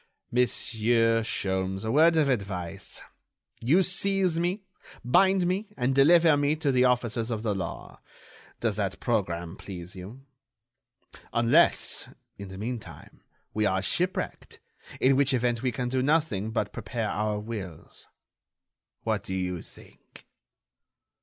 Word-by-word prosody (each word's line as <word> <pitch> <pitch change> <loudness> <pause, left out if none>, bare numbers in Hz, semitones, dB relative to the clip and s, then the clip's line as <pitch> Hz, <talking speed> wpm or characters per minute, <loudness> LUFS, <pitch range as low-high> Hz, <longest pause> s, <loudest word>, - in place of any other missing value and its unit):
Monsieur 115 -1 +2
Sholmes, 95 -2 -2
a 110 - -1
word 165 +5 +5
of 155 -3 +3
advice; 95 -9 -3 0.6
you 155 +11 +3
seize 190 -2 +1
me, 180 +4 -1 0.4
bind 190 +8 +4
me 190 +4 -1
and 125 +1 +1
deliver 160 +3 +6
me 145 +1 +1
to 150 -3 0
the 125 -1 +3
officers 120 -2 0
of 110 -2 -3
the 110 -3 0
law. 95 -4 -6 0.6
Does - - 0
that - - -2
programme 85 +1 -1
please 90 -2 -8
you?... 105 +9 -10 1.1
Unless, 120 +9 +3 0.3
in 100 - -7
the 95 0 -9
meantime, 115 +3 -7 0.3
we 105 -1 +1
are 95 0 0
shipwrecked, 180 - -2 0.4
in 130 +1 +4
which 135 -1 +3
event 120 -1 0
we 130 - 0
can 125 0 -3
do 130 +1 0
nothing 135 -8 +1
but 105 -3 -2
prepare 115 0 -3
our 105 0 -1
wills. 105 -6 -8 1.0
What - - -1
do 95 - -4
you 90 -2 -2
think?" - - -15
120 Hz, 135 wpm, -27 LUFS, 100-145 Hz, 1.1 s, deliver